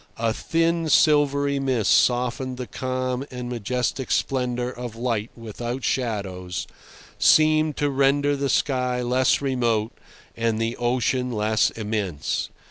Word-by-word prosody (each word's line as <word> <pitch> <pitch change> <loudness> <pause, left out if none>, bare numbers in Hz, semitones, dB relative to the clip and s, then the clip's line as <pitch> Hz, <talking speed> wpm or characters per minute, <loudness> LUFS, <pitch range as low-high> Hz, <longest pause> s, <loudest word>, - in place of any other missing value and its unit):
A 115 -1 0
thin, 165 +3 0
silvery 145 -2 +3
mist 130 -6 +1
softened 125 +1 +2
the 125 - -4
calm 130 +1 -3
and 125 -1 -6
majestic 125 +2 -2
splendour 125 -2 0
of 120 -3 -7
light 115 -2 -2
without 120 +3 -5
shadows—seemed 120 - 0
to 145 - +1
render 140 +1 +2
the 140 0 -2
sky 125 -3 0
less 130 +3 +2
remote 120 -5 0 0.4
and 115 -1 0
the 115 +1 -1
ocean 125 +1 0
less 110 -1 +2
immense. 105 -9 -3
125 Hz, 120 wpm, -24 LUFS, 115-135 Hz, 0.4 s, silvery